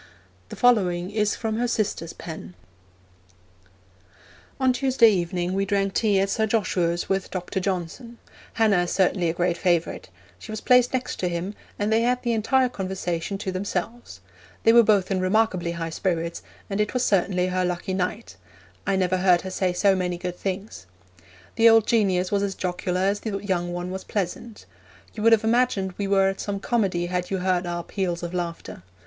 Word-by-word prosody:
The - - -7
following 185 -7 +2
is 210 -1 +1
from 220 -1 -3
her 245 +1 0
sister's 195 -7 -2
pen: 90 - -9 2.0
On 260 -1 +3
Tuesday 250 -3 +4
evening 175 -1 -1
we 195 +1 +1
drank 195 -1 0
tea 205 -4 +2
at 195 +1 0
Sir 220 +1 +1
Joshua's 180 -5 0
with 195 0 -1
Dr. 185 0 -3
Johnson. 190 +6 -4 0.4
Hannah 215 -5 +3
is - - -5
certainly 185 -2 +2
a - - -1
great 175 0 0
favourite. 170 - 0 0.3
She - - -9
was 215 - -4
placed 250 +1 +4
next 255 -1 -3
him, 180 +2 -2 0.2
and 210 +2 0
they 225 - +3
had 250 +1 +1
the 240 -1 0
entire 255 +4 +2
conversation 190 -3 -3
to 195 -1 -4
themselves. 185 - -4 0.4
They 225 - +6
were 235 - +8
both 205 -4 +2
in 190 - +1
remarkably 185 -3 +1
high 165 -1 -4
spirits, 170 -1 -2 0.3
and 200 +1 -1
it 210 +4 -2
was 250 - +1
certainly 180 -2 +2
her 185 0 0
lucky 180 +1 -2
night; 180 - -3 0.5
I 195 - +2
never 185 -1 +1
heard 180 -2 +4
her 190 - -6
say 185 -1 0
so 195 +2 +3
many 180 -1 -2
good 180 0 -5
things. 190 - -5 0.7
The 230 0 +7
old 225 -1 +5
genius 190 -5 +1
was 200 -1 +1
as 200 -1 -2
jocular 180 0 -2
as 200 +2 +1
the 210 -3 -3
young 180 -3 -2
one 175 +1 -4
was 190 0 -5
pleasant. 205 +3 -4 0.5
You 215 - -6
would 230 +1 +5
have 225 -1 +5
imagined 220 -5 +1
we 200 - -1
were 195 -1 +3
at 195 0 -2
some 200 -1 -3
comedy 195 -7 0
had 180 0 -2
you 195 - -1
heard 180 -1 0
our 175 0 -3
peals 175 -3 -3
of 170 +1 -5
laughter. 170 - -5
190 Hz, 185 wpm, -24 LUFS, 180-215 Hz, 2.0 s, were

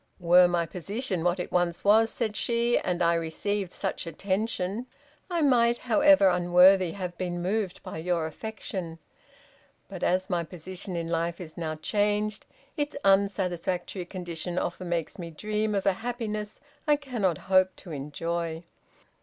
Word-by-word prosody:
"Were 180 +1 +6
my 175 -1 +1
position 190 - -3
what 175 +1 +1
it 180 - -4
once 175 -1 0
was," 220 +2 +5
said 220 -3 -2
she, 235 +1 +1
"and 180 -1 -1
I 170 0 +4
received 180 +4 -2
such - - -3
attention, 195 +5 -2 0.4
I 340 -3 0
might, 240 -4 +4
however 290 -2 +5
unworthy, 180 0 +5
have 180 -3 -5
been 175 -1 -2
moved 190 +1 -2
by - - -6
your 170 -1 0
affection, 180 -1 -6 0.9
but - - -8
as 185 +1 +1
my 175 -3 0
position 180 +3 -6
in 165 -1 -2
life 170 0 -1
is 165 -4 -9
now 160 -2 -3
changed, 210 +4 0 0.3
its 295 -1 -2
unsatisfactory 185 -2 +1
condition 175 -1 -5
often 180 0 -3
makes 170 +1 -2
me 170 -1 -5
dream 210 +5 -2
of 195 - -1
a 195 - +4
happiness 215 -3 -4 0.3
I 295 - +6
cannot 240 - -1 0.2
hope 185 0 +5
to 175 - -11
enjoy." 165 +3 -3
185 Hz, 150 wpm, -27 LUFS, 170-210 Hz, 0.9 s, Were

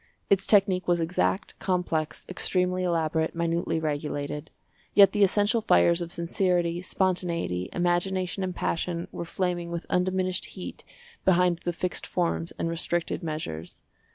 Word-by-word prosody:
Its 195 -1 +4
technique 195 -3 +4
was 175 -1 +3
exact, 180 +5 0
complex, 175 -4 -1
extremely 185 0 0
elaborate, 160 -2 0
minutely 170 -1 0
regulated; 150 -1 -3 0.5
yet 200 -2 +8
the 205 -1 +3
essential 205 +3 +3
fires 170 - +4
of 170 0 -4
sincerity, 175 0 0
spontaneity, 175 - -1
imagination 180 +1 0
and 185 -1 -3
passion 170 0 -2
were 170 - -5
flaming 175 0 -2
with 170 0 -4
undiminished 185 0 0
heat 185 - -8 0.4
behind 180 -2 +3
the 175 - +1
fixed 180 +1 -3
forms 170 -1 -1
and - - -1
restricted 170 +1 -1
measures. 155 - -5
175 Hz, 130 wpm, -27 LUFS, 165-185 Hz, 0.5 s, yet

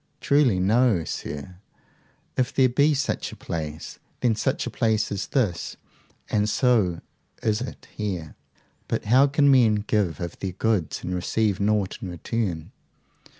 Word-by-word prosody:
Truly 140 -9 +3
no, 105 -1 +3
sir, 75 +3 -6 0.8
if 125 -1 +1
there 130 -1 +4
be 145 +4 +3
such 140 +1 -2
a - - -9
place. 80 -1 -6 0.2
Then 120 -3 +3
such 130 +5 -1
a 120 - -4
place 110 -2 +1
is 100 0 -3
this, 105 - -1 0.5
and 105 0 +1
so 105 -7 +2 0.4
is 110 0 +1
it 130 - -7
here. 90 -7 -4 0.5
But - - -2
how 130 +6 +5
can 140 0 +4
men 120 -5 +5
give 100 -6 0
of 85 -2 -6
their 95 -2 -3
goods 100 -4 -1
and 90 - -3
receive 100 +3 0
nought 100 -1 0
in 95 - -5
return? 90 -2 -3
105 Hz, 150 wpm, -25 LUFS, 90-125 Hz, 0.8 s, how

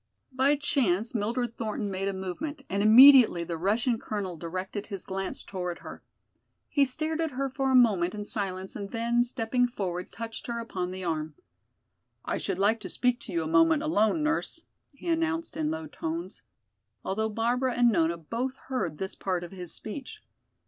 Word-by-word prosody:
By 265 +3 +3
chance 235 -8 +1
Mildred 235 +2 -1
Thornton 215 -2 -2
made 190 +1 -2
a 200 - -1
movement 270 - -5
and 200 +1 +1
immediately 235 -4 +8
the 170 0 -4
Russian 220 +7 +1
colonel 200 -6 -4
directed 185 +5 -5
his 195 -4 -6
glance 195 0 -4
toward 180 -3 -4
her. - - -9 0.7
He 285 -2 +4
stared 310 +5 -2
at 320 -4 -1
her 275 -1 -1
for 270 0 0
a - - +4
moment 205 -7 +4
in 210 0 -5
silence 190 -3 -4
and 200 -1 -5
then, 235 +1 +1
stepping 245 0 0
forward, 185 -6 -4
touched 230 -1 -7
her 235 -1 -3
upon 185 -6 -3
the 185 0 -6
arm. 155 -3 -2 0.9
"I - - -1
should - - -2
like 210 +4 +3
to - - -7
speak 250 0 +1
to 290 - -8
you 340 - 0
a - - -3
moment 325 -2 +4
alone, 300 0 +2
nurse," 310 +1 -1 0.3
he 275 - -10
announced 330 -1 0
in 310 -1 -1
low 320 0 -3
tones, 170 - -5 0.6
although 220 +3 0
Barbara 240 +4 0
and 240 -1 +5
Nona 170 -3 +2
both 235 - -4
heard 175 - -2
this 190 +3 -4
part 180 -2 -2
of 175 - -8
his 180 -3 -7
speech. 275 - -8
225 Hz, 180 wpm, -28 LUFS, 190-265 Hz, 0.9 s, immediately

